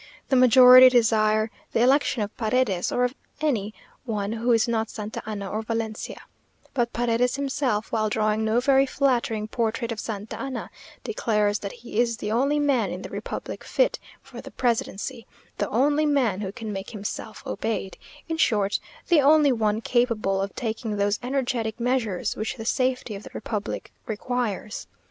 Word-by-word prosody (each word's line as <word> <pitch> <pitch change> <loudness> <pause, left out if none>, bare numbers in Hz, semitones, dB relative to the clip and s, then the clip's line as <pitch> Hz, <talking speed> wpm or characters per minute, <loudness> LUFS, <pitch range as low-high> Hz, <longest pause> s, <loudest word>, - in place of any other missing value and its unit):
The 270 - +3
majority 255 0 +9
desire 215 -2 +3 0.2
the - - +2
election 260 -2 +3
of 205 - -6
Paredes, 220 -5 0
or 245 - +1
of 250 0 +1 0.3
any 235 -10 0 0.3
one 210 -5 -2
who 230 +2 0
is 230 +1 +3
not 225 -1 0
Santa 215 0 -6
Anna 205 -2 -4
or 215 +3 -3
Valencia; 225 -1 -4 0.5
but 240 -3 0
Paredes 240 +1 +1
himself, 270 -6 -1
while 215 -1 +1
drawing 215 0 +1
no 220 +2 +2
very 270 +1 +4
flattering 240 -6 0
portrait 230 +1 -2
of 225 - -4
Santa 215 -1 -5
Anna, 270 -1 -5 0.3
declares 210 - 0
that 200 - -5
he 230 -2 -5
is 235 -1 +2
the 210 -3 -4
only 275 +6 +2
man 270 -9 +2
in 180 +2 -6
the - - -7
republic - - -6
fit - - +1 0.2
for - - -10
the - - -10
presidency 230 -2 -2 0.3
the - - 0
only 290 +6 +2
man 245 -9 +1
who 190 -2 -3
can 220 -1 -6
make 195 0 -5
himself 215 0 -6
obeyed 215 -4 -3 0.3
in 325 -1 -2
short, 205 -9 +2 0.3
the 335 -4 +5
only 295 0 +5
one 220 -2 0
capable 225 -5 +1
of 195 0 -4
taking 220 -2 -3
those 205 +1 +1
energetic 245 -3 -2
measures 235 -6 0
which 220 +5 -3
the 225 -3 -7
safety 255 -1 0
of 200 - -7
the - - -11
republic 210 -2 -4 0.2
requires. 220 -1 -3
230 Hz, 165 wpm, -25 LUFS, 215-255 Hz, 0.5 s, majority